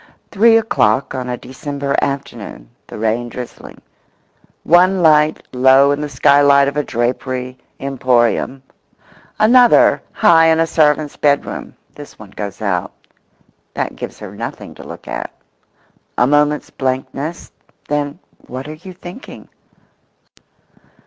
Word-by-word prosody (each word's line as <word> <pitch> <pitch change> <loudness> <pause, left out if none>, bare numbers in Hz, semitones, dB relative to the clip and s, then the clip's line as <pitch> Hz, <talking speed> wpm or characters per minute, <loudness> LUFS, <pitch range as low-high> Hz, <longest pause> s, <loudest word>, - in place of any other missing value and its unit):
Three 225 +2 +5
o'clock 140 - +1
on 130 -1 -4
a 125 - -3
December 140 +2 -4
afternoon; 140 - -5 0.2
the - - -9
rain 115 +2 -1
drizzling; 125 0 -9 0.8
one 180 +2 +4
light 155 -1 +3
low 130 +2 +5
in 145 +1 -1
the 150 - -4
skylight 140 +1 +4
of 140 - -3
a 150 - +1
drapery 125 +1 -3 0.2
emporium; 130 -1 0 0.7
another 240 +3 +5
high 165 -1 +4
in 160 0 +3
a 165 - +3
servant's 150 -2 +1
bedroom—this 145 0 -3
one 105 -2 -13
goes 100 +1 -7
out. 90 -4 -2 0.8
That - - -3
gives - - -7
her - - -10
nothing - - -7
to - - -12
look - - -11
at. - - -5 0.9
A 125 - +4
moment's 150 +2 +1
blankness—then, 145 +2 -5 0.3
what 130 +2 -7
are 155 - -6
you 180 +4 -11
thinking? 180 +8 -11
140 Hz, 120 wpm, -17 LUFS, 130-155 Hz, 0.9 s, Three